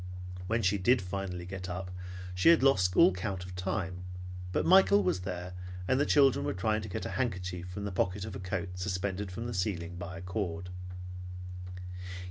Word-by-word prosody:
When 115 +2 +1
she 100 +1 +3
did 120 +7 +5
finally 90 -1 -4
get 90 0 -5
up, 90 +1 -4 0.4
she 90 - +5
had 165 -5 +7
lost 90 -10 +4
all 95 - +8
count 90 0 -3
of 90 - -8
the 90 - -5
time, 90 -1 -2 0.5
but - - +1
Michael 195 +3 +7
was - - +2
there, 90 -1 -4 0.3
and 130 - +3
the 145 - +3
children 135 -3 +5
were - - -1
trying 110 +4 +1
to 105 - -6
get 90 - -3
a - - -2
handkerchief 90 -6 -2
from 100 +3 -5
the 100 - -2
pocket 95 +1 0
of 105 -3 -6
a - - -5
coat 90 -1 -3
suspended 95 +1 -2
from 115 +6 -4
the 120 - -3
ceiling 90 -2 -1
by 90 +1 -6
a - - -7
cord. 90 -2 -3
95 Hz, 195 wpm, -31 LUFS, 90-105 Hz, 0.5 s, all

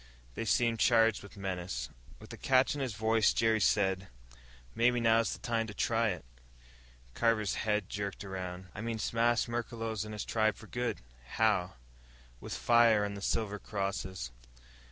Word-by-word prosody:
They 115 - -4
seemed 115 +1 +2
charged 115 -3 +4
with 100 0 -13
menace. 90 -10 -4 0.3
With - - -11
a - - -5
catch 130 0 +3
in 145 - -4
his 125 -6 -2
voice, 110 0 +3
Jerry 115 -1 +2
said, 95 -2 +2 0.7
"Maybe 120 +1 +3
now's 115 0 +3
the - - -7
time 115 -2 -1
to 105 - -8
try 115 +1 +1
it." 90 - -5 0.9
Carver's 110 - +1
head 105 -3 0
jerked 100 0 -5
around. 90 -1 -6
"I 105 - -6
mean 115 0 -3
smash 115 +2 +1
Merklos 115 -2 -3
and 110 0 -7
his 105 - -4
tribe 110 -1 +1
for - - -13
good." 120 -1 -3 0.4
"How?" 100 - +2 0.6
"With - - -6
fire, 115 -3 +4
and 100 0 -4
the 100 - -7
silver 105 0 -1
crosses." 95 - -4
110 Hz, 160 wpm, -32 LUFS, 100-115 Hz, 0.9 s, charged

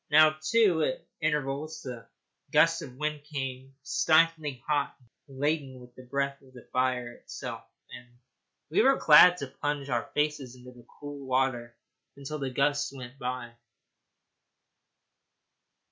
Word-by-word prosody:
Now, 155 +1 +6
too, 185 -1 +3
at 130 - -1 0.2
intervals 150 0 -2
the 120 -3 -8 0.4
gusts 165 +1 +4
of 125 -5 -9
wind 150 +1 -3
came 135 -2 -6
stiflingly 155 -5 +2
hot, 145 -3 0 0.3
laden 140 -1 -2
with 125 0 -15
the 130 - -13
breath 140 +2 -2
of 130 -1 -20
the 125 - -13
fire 125 -1 0
itself, - - -8 0.3
and 120 - -10 0.6
we - - +4
were 270 +4 +5
glad 175 +1 +7
to 140 - -5
plunge 145 +1 -4
our 120 -1 -1
faces 150 -4 -1
down 125 - -16
into 125 -1 -15
the 120 - -18
cool 145 -2 -8
water 125 -2 0 0.4
until 140 +2 -6
the 135 -1 -2
gusts 145 +2 0
went 130 0 -10
by. 125 -1 -4
140 Hz, 140 wpm, -28 LUFS, 130-150 Hz, 0.6 s, glad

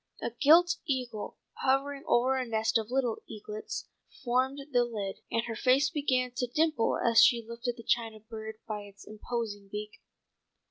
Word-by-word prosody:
A - - -3
gilt 330 +8 +5
eagle, 250 -6 -3 0.3
hovering 275 +1 +1
over 255 +2 +3
a 260 - 0
nest 225 -1 +1
of 220 0 -5
little 250 -3 0
eaglets 215 0 -6 0.4
formed 255 +2 +1
the 245 -2 +4
lid, 210 -5 -4
and 230 - 0
her 230 -1 -4
face 270 +5 +3
began 255 -4 0
to 250 - 0
dimple 305 -1 +1
as 230 -1 +5
she 235 -2 +5
lifted 235 +1 -4
the 230 - -10
china 225 -2 0
bird 220 0 -8
by 215 -1 -3
its 200 -1 -13
imposing 215 -2 -5
beak. 210 0 -6
235 Hz, 165 wpm, -30 LUFS, 220-260 Hz, 0.4 s, gilt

